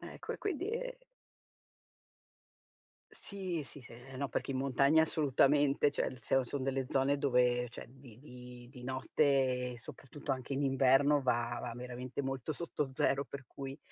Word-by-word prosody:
ecco -, -, -7 dB
e -, -, -7 dB
quindi 380 Hz, 0 st, -2 dB
e -, -, -4 dB, 2.1 s
Sì, 185 Hz, -5 st, -5 dB
sì, 145 Hz, -, -11 dB
eh 125 Hz, +3 st, -11 dB
no, 140 Hz, 0 st, -2 dB
perché -, -, -2 dB
in 135 Hz, -, -1 dB
montagna 140 Hz, +4 st, +4 dB
assolutamente, 145 Hz, -1 st, +3 dB
cioè 130 Hz, -2 st, -2 dB
se 135 Hz, +3 st, +2 dB
sono 130 Hz, +2 st, -3 dB
delle 135 Hz, -1 st, -1 dB
zone, 135 Hz, +1 st, +2 dB
dove 125 Hz, -3 st, +2 dB
cioè -, -, -9 dB
di 125 Hz, -3 st, -15 dB
di 125 Hz, -3 st, -12 dB
di 125 Hz, -2 st, -12 dB
notte, 130 Hz, -1 st, +1 dB
soprattutto 135 Hz, +5 st, -6 dB
anche 130 Hz, +1 st, -4 dB
in 140 Hz, -, 0 dB
inverno, 135 Hz, +2 st, +4 dB
va 120 Hz, -2 st, 0 dB
va 120 Hz, -, -4 dB
veramente 125 Hz, +1 st, -5 dB
molto 135 Hz, +2 st, -3 dB
sotto 150 Hz, -3 st, -3 dB
0, 140 Hz, -1 st, +1 dB
per 140 Hz, -2 st, -8 dB
cui 135 Hz, +1 st, -7 dB
135 Hz, 150 wpm, -33 LUFS, 125-145 Hz, 2.1 s, montagna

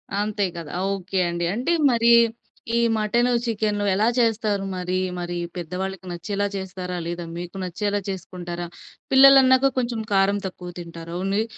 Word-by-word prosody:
అంతే 205 Hz, 0 st, -1 dB
గదా! 165 Hz, -3 st, -7 dB, 0.2 s
ఓకే 190 Hz, 0 st, -3 dB
అండి. 170 Hz, 0 st, -2 dB
అంటే 250 Hz, +9 st, -1 dB, 0.2 s
మరి 235 Hz, 0 st, +3 dB, 0.7 s
ఈ -, -, +3 dB, 0.2 s
మటను, 235 Hz, +4 st, +2 dB
చికెను 210 Hz, -2 st, -1 dB
ఎలా 210 Hz, +4 st, +2 dB
చేస్తారు? 215 Hz, -3 st, +1 dB
మరి 180 Hz, 0 st, -2 dB, 0.2 s
మరి 175 Hz, 0 st, -4 dB, 0.2 s
పెద్ద 170 Hz, -1 st, -6 dB
వాళ్ళకి 190 Hz, -1 st, -5 dB
నచ్చేలా 200 Hz, +4 st, -2 dB
చేస్తారా? 185 Hz, -1 st, -5 dB
లేదా 175 Hz, 0 st, -4 dB
మీకు 175 Hz, +2 st, -7 dB
నచ్చేలా 205 Hz, +3 st, -1 dB
చేసుకుంటారా? 175 Hz, -2 st, -5 dB, 0.5 s
పిల్లలన్నాక 270 Hz, 0 st, +7 dB
కొంచెం 235 Hz, -2 st, -2 dB
కారం 195 Hz, +1 st, +3 dB
తక్కువ 180 Hz, -1 st, -8 dB
తింటారు. 170 Hz, 0 st, -8 dB
ఓన్లీ. 200 Hz, +3 st, +1 dB
195 Hz, 140 wpm, -23 LUFS, 175-220 Hz, 0.7 s, పిల్లలన్నాక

